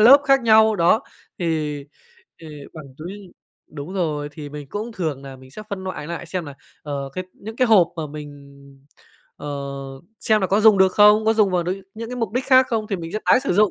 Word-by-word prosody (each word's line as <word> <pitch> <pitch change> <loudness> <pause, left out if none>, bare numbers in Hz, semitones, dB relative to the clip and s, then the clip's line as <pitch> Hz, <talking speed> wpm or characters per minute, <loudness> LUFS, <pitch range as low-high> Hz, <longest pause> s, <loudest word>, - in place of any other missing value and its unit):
lớp 260 +6 +8
khác 275 -1 +4
nhau, 220 -1 +5
đó, 180 +7 +3 0.4
thì 155 -5 -2 0.6
thì 165 - -11 0.3
bằng 155 -2 -9
túi 170 +4 -7 0.6
đúng 150 +3 -8
rồi, 150 -6 -2
thì 145 -1 -8
mình 145 0 -8
cũng, 220 +3 -5
thường 155 -9 -3
nà 135 -1 -9
mình 130 0 -16
sẽ 215 +10 -9
phân 195 -2 -5
loại 185 -5 -5
lại 170 +1 -6
xem 175 +1 -4
là, 145 -2 -9 0.3
ờ, 140 -2 -4
cái 185 - -5
những 220 +2 -10
cái 255 - +3
hộp 200 -7 +5
mà 160 - -3
mình, 150 0 -8 1.1
ờ 145 - -8 0.7
xem 215 -1 +2
là 190 - +1
có 200 +3 +2
dùng 215 -2 +6
được 190 -1 +4
không, 210 +1 +6
có 220 - +4
dùng 215 -3 +3
vào 180 -1 +1
n - - -10 0.3
những 225 +1 -7
cái 250 - -5
mục 230 -5 -3
đích 250 +3 -1
khác 260 -1 +6
không, 225 -4 -1
thì 200 - -2
mình 165 -1 -7
sẽ 215 - -1
tái - - +5
sử 275 - -1
dụng, 210 +1 +4
190 Hz, 230 wpm, -21 LUFS, 155-220 Hz, 1.1 s, lớp